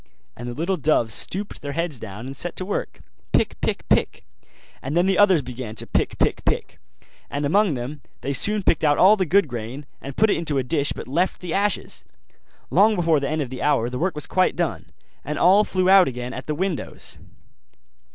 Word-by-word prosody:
And 120 - -7
the 120 - -6
little 175 +6 -1
doves 140 -8 +2
stooped 200 - +1
their 145 0 -5
heads 165 -5 -3
down 105 +2 -8
and 135 +1 -7
set 175 +5 -2
to 185 - -5
work, 200 - -4 0.3
pick, - - +1
pick, - - -2
pick; - - +1 0.6
and 140 +5 -3
then 175 - +4
the 195 0 +2
others 190 -7 +5
began 120 -3 -7
to - - -4
pick, - - -1
pick, - - 0
pick: - - -2 0.5
and 145 +1 -2
among 195 +1 +2
them 130 +4 -6
all - - -33
they 140 - -2
soon 205 +9 +2
picked 165 - +2
out 145 -1 +3
all 195 +4 +7
the 190 -4 -1
good 195 +2 +3
grain, 120 +3 -6 0.2
and 140 0 -8
put 220 -1 +4
it - - +1
into 155 -4 -2
a 135 - +1
dish 145 +2 0
but - - -6
left 170 +8 0
the 175 -3 -5
ashes. 200 0 -1 0.7
Long 210 +4 +5
before 165 -4 +2
the 140 - -2
end 155 0 -1
of 130 - -9
the 130 - -6
hour 135 -5 +1
the 125 - -4
work 180 0 -1
was 150 - -5
quite 185 0 +1
done, - - -2 0.4
and 150 +2 -4
all 195 +4 +5
flew 185 -3 0
out 190 -1 +7
again 125 0 -5
at - - -7
the 150 - -1
windows. 180 -1 -4
155 Hz, 220 wpm, -23 LUFS, 135-185 Hz, 0.7 s, all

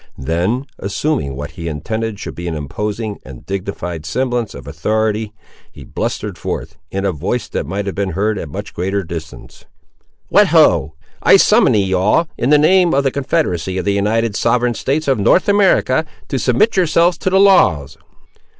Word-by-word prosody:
Then, 90 - -1
assuming 100 - -2
what 70 +2 -6
he 85 - -7
intended 110 +7 -4
should - - -6
be 85 +1 -7
an 85 - -3
imposing 105 - -4
and 65 -2 -12
dignified 95 -4 -5
semblance 120 +4 -2
of - - -10
authority, 110 0 -1 0.4
he - - -12
blustered - - -4
forth, 80 - -5
in 95 +1 -3
a 100 - +1
voice 75 - -3
that - - -3
might 100 +4 -3
have 100 - -3
been 100 -2 -2
heard 105 +3 0
at - - -5
a - - -13
much - - -7
greater 95 +3 -2
distance— 80 -6 -9 0.6
"What, - - +5
ho! 75 +3 +3 0.3
I - - +6
summon - - +4
ye 95 -2 +1
all, 105 - +2
in 125 - -1
the 150 - +6
name 175 +2 +4
of 140 - +2
the 135 - +1
Confederacy 130 - -1
of 95 - -3
the 100 - +1
United 105 +2 0
Sovereign 120 +1 +1
States 145 +6 -2
of 135 -5 +2
North 140 - +3
America, 195 -8 +3 0.3
to 135 - -1
submit 125 - +2
yourselves 170 -1 +2
to - - 0
the 190 +1 +3
laws." 95 - +4
105 Hz, 180 wpm, -17 LUFS, 90-135 Hz, 0.6 s, I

